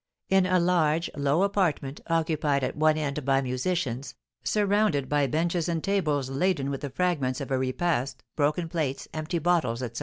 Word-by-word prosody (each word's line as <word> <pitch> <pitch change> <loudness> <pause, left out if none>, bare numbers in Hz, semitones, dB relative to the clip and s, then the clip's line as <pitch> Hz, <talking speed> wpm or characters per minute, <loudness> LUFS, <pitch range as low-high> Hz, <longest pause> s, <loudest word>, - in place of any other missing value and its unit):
In 190 -1 +4
a 185 0 +3
large, 170 -2 +2
low 145 +5 +2
apartment, 180 -9 0
occupied 155 -4 +1
at 130 - -2
one 155 0 +3
end 150 -1 -2
by 135 0 +3
musicians, 130 0 -2 0.3
surrounded 205 -8 +1
by 145 -1 +2
benches 170 +4 0
and 165 -2 -1
tables 155 -9 0
laden 140 0 0
with 135 - -4
the 145 - -4
fragments 140 -4 0
of 140 - -6
a 130 - +2
repast, 130 +1 -1
broken 155 +3 +1
plates, 155 -5 -2
empty 155 +2 -2
bottles, 160 -8 +1
etc. 120 - -4
155 Hz, 170 wpm, -27 LUFS, 135-175 Hz, 0.3 s, In